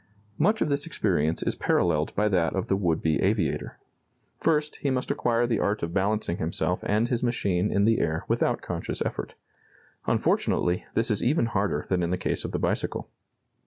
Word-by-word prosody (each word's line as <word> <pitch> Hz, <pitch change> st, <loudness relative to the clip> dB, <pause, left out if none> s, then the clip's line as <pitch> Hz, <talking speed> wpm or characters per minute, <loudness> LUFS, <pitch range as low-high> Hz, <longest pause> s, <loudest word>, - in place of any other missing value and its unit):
Much 215 Hz, +1 st, +3 dB
of -, -, -2 dB
this 140 Hz, 0 st, -1 dB
experience 80 Hz, +2 st, 0 dB
is -, -, 0 dB
paralleled 75 Hz, 0 st, +1 dB
by 105 Hz, +1 st, +2 dB
that 90 Hz, -5 st, +1 dB
of 95 Hz, -, -1 dB
the 95 Hz, -, +3 dB
would 85 Hz, -5 st, 0 dB
be 80 Hz, -3 st, +2 dB
aviator. 95 Hz, -6 st, 0 dB, 0.6 s
First, 150 Hz, -2 st, +1 dB
he 140 Hz, -, -1 dB
must 130 Hz, -1 st, -1 dB
acquire 120 Hz, 0 st, +1 dB
the 115 Hz, -3 st, 0 dB
art 100 Hz, -1 st, 0 dB
of 85 Hz, 0 st, -3 dB
balancing 100 Hz, -2 st, 0 dB
himself 85 Hz, +2 st, -1 dB
and 110 Hz, +3 st, +2 dB
his 120 Hz, -1 st, -1 dB
machine 100 Hz, -6 st, 0 dB
in 100 Hz, 0 st, +3 dB
the 115 Hz, 0 st, +3 dB
air 80 Hz, 0 st, -1 dB
without -, -, +1 dB
conscious -, -, -3 dB
effort. -, -, -4 dB, 0.7 s
Unfortunately, 90 Hz, +1 st, +1 dB
this 115 Hz, 0 st, +2 dB
is 105 Hz, -, +1 dB
even 135 Hz, 0 st, +2 dB
harder 105 Hz, -3 st, -1 dB
than 90 Hz, -2 st, +1 dB
in 85 Hz, -, 0 dB
the 90 Hz, -, 0 dB
case 90 Hz, -, -2 dB
of -, -, -4 dB
the -, -, -1 dB
bicycle. -, -, -2 dB
100 Hz, 190 wpm, -26 LUFS, 90-120 Hz, 0.7 s, Much